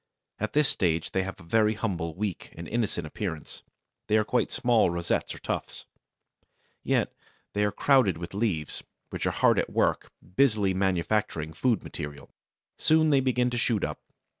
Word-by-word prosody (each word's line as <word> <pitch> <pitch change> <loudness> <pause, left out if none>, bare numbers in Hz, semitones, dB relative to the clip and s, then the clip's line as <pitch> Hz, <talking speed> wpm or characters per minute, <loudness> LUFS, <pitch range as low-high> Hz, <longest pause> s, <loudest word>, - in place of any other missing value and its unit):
At 110 - -2
this 150 -1 +4
stage 85 -7 0
they 95 - +1
have 95 0 -6
a - - -13
very 110 +5 +2
humble, 85 -7 -3
weak, 100 -3 -4
and 85 - -7
innocent 110 -7 -1
appearance: 80 0 -5 0.5
they 110 - +4
are 110 - +3
quite 120 +2 0
small 120 -6 +3
rosettes 85 0 -1
or - - -10
tufts. - - -5 1.0
Yet - - +1 0.4
they 105 - +1
are 105 - +1
crowded 130 - +3
with 85 +2 -7
leaves, 95 -8 -2 0.3
which - - -2
are - - +4
hard - - +3
at - - -1
work - - 0 0.2
busily 105 -8 +3
manufacturing 95 -3 0
food 120 +6 +1
material. 75 -1 -7 0.5
Soon 155 0 +4
they 140 - +5
begin 125 -1 +1
to 120 - -1
shoot 115 -4 +1
up. - - -3
105 Hz, 165 wpm, -27 LUFS, 85-115 Hz, 1.0 s, they